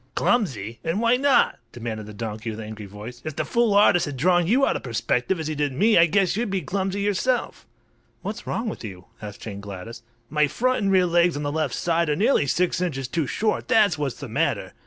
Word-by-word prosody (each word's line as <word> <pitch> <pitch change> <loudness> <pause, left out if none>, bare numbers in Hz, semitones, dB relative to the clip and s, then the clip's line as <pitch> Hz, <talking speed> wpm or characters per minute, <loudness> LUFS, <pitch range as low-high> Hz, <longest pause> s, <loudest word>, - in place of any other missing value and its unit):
"Clumsy! 115 - 0
And 165 +5 -1
why 230 +1 +4
not?" 275 +1 +3
demanded 115 -3 -6
the - - -8
donkey, 110 +1 -5
with 110 0 -6
angry 110 -1 -7
voice. 105 +5 -10
"If 155 -2 -5
the - - -2
fool 235 -3 +2
artist 200 -5 +5
had 145 -2 -5
drawn 175 +4 +3
you 260 +7 +4
out - - 0
of - - -3
perspective, 125 +7 -1
as 160 - -4
he 155 - -2
did 145 -2 -1
me, 215 - +3
I 170 0 +6
guess 190 +1 +2
you'd 230 +1 -1
be 190 -1 -1
clumsy 195 +5 -2
yourself." 205 +5 -1 0.6
"What's - - -6
wrong 230 - -2
with 215 - -5
you?" 95 -4 -8 0.2
asked 105 -1 -8
Jane 100 -3 -7
Gladys. 100 +4 -8 0.3
"My 150 +2 +2
front 255 - 0
and 195 -1 +1
rear 185 -1 +4
legs 170 -2 +2
on 145 - -4
the 145 - -1
left 155 -4 -1
side 170 -2 0
are 150 - +2
nearly 210 - +2
six 180 +4 +1
inches 135 -8 -2
too 160 +1 -1
short, 215 - -1
that's 205 -8 +3
what's 140 -5 -3
the - - -6
matter! - - -1
160 Hz, 225 wpm, -24 LUFS, 120-200 Hz, 0.6 s, I